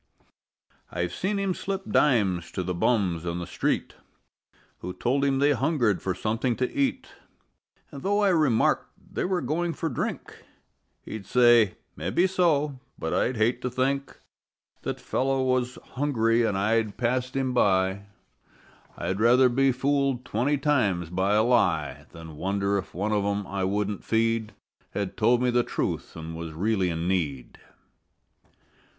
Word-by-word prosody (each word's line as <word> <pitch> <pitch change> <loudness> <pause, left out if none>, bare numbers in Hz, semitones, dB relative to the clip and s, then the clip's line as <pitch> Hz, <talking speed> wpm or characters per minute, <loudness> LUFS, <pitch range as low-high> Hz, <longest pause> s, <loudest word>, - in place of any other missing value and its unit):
I've 85 0 -2
seen 200 +2 -1
him 195 -2 0
slip 195 +1 -4
dimes 100 - +2
to 95 - -2
the 90 +1 -2
bums 90 -4 +1
on 85 0 -3
the 85 - -4
street - - -1 0.9
Who 90 - -6
told 130 +9 0
him 135 -1 +2
they 145 +2 +3
hungered 135 - +1
for 95 -2 -2
something 115 +3 -1
to 125 +1 -2
eat, 265 -2 0 0.8
An' 140 - -8
though 205 +4 +1
I 200 - +4
remarked 155 -10 +2 0.2
they - - -1
were 185 -1 0
going 165 +6 -1
for 165 - -3
drink 125 - -5 0.6
He'd 105 -3 -8
say: 120 -5 +5 0.2
"Mebbe 95 - +1
so. 150 -7 +1 0.2
But 80 - -3
I'd 125 - +1
just 110 -3 +1
hate 120 +2 +1
to 125 - -2
think 135 +2 -1 0.6
That - - -4
fellow 135 0 0
was 130 -1 0 0.2
hungry 120 -4 +1
an' 100 - -1
I'd 110 +1 0
passed 125 +1 -1
him 130 -2 0
by; 95 -3 +2 0.9
I'd 95 +2 -2
rather 125 +3 +5
be 135 +2 +3
fooled 135 -1 0
twenty 130 +5 0
times 105 - +1
by 95 +3 +1
a 110 - +4
lie 120 0 +1
Than 80 -2 -11
wonder 100 +2 0
if 95 - -9
one 100 +4 -1
of 105 -1 +1
'em 100 0 -1
I 95 -1 -2
wouldn't 105 +1 -2
feed 115 -1 0 0.4
Had 100 -2 -2
told 120 +4 +3
me 125 - +2
the 120 0 +3
truth - - -3
an' 80 0 -7
was 80 -1 -6
really 95 +2 0
in 85 0 -2
need." 75 -9 -2
115 Hz, 155 wpm, -26 LUFS, 95-135 Hz, 0.9 s, say